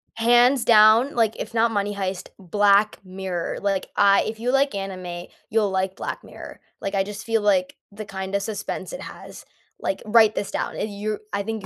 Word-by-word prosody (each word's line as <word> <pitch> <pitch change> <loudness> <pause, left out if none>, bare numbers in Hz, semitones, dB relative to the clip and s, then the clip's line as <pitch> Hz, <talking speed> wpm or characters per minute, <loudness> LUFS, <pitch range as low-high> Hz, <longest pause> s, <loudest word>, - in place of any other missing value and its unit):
Hands 240 +2 +4
down, 225 +4 +6
like, 225 -2 +2
if 220 - -6
not 230 0 +2
Money 205 -1 -1
Heist, 190 -2 -4
Black 205 +2 +2
Mirror, 185 -2 -4
like, 195 -2 -1
I 200 -1 +5
if 220 0 -5
you 245 +2 0
like 275 -2 +2
anime, 185 -3 -6 0.2
you'll 215 -2 +1
like 190 0 -1
Black - - -5
Mirror, - - -11 0.2
like, 195 +1 -3
I 195 - +2
just 205 +1 -8
feel 225 -1 +1
like 190 -3 +1 0.2
the 215 +1 -7
kinda 195 0 -3
suspense 210 0 -5
it - - -6
has - - -11 0.4
like, 195 - -2
write 220 0 +5
this 200 - -3
down, - - -3
er, - - -6
you 210 0 -3 0.2
I 200 - 0
think 220 -1 -5
205 Hz, 190 wpm, -23 LUFS, 195-225 Hz, 0.4 s, down